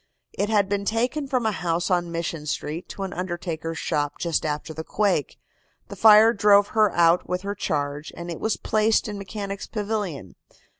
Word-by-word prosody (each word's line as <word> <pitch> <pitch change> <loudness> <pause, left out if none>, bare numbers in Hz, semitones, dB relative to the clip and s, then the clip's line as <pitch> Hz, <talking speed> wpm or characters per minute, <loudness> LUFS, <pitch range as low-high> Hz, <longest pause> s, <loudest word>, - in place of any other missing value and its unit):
It 205 - -1
had 205 -3 +3
been 200 0 -1
taken 245 +8 -1
from 255 -4 0
a 220 - +2
house 170 -1 -1
on 175 -1 +1
Mission 165 -2 -4
Street 155 +3 -4
to 195 - -6
an 190 - -4
undertaker's 170 -2 -4
shop 145 -1 -1
just 165 -2 -1
after 150 +1 -4
the 160 +1 -6
quake. 195 -6 0 0.5
The - - -7
fire 220 +1 +7
drove 205 -1 +5
her 215 -3 +3
out 170 +1 +3
with 180 +1 -2
her 200 0 -2
charge, 145 -4 -3
and 170 0 -6
it 165 - -6
was 220 - -1
placed 215 +1 +1
in 205 -1 -5
Mechanics' 200 0 -6
Pavilion. 205 - -4
190 Hz, 185 wpm, -24 LUFS, 165-210 Hz, 0.5 s, fire